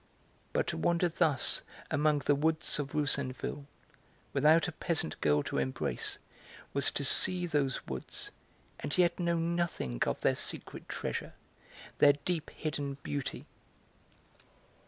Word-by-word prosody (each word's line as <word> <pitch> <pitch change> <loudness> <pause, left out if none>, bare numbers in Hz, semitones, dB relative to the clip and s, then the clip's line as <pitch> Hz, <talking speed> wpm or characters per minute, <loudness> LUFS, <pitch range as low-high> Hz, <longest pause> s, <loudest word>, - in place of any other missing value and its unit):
But - - +1
to - - -3
wander 170 - +2
thus 160 -5 +2 0.3
among 150 -1 +2
the 145 - +5
woods 155 +2 0
of 140 -2 -4
Roussainville 140 -1 0 0.7
without 155 +4 +5
a - - -3
peasant 155 - -2
girl 75 -1 +3
to - - -2
embrace 65 -2 0 0.6
was 140 -1 +3
to 140 - -2
see 180 +6 +4
those 145 -5 0
woods 65 -1 -5 0.5
and 145 +4 -3
yet 175 -1 +3
know 170 -1 +1
nothing 165 - -1
of - - -1
their - - +3
secret - - -3
treasure, - - -3 0.7
their 145 -1 +8
deep 175 -4 -1
hidden 145 -3 -3
beauty. 140 -2 -3
145 Hz, 130 wpm, -32 LUFS, 140-165 Hz, 0.7 s, their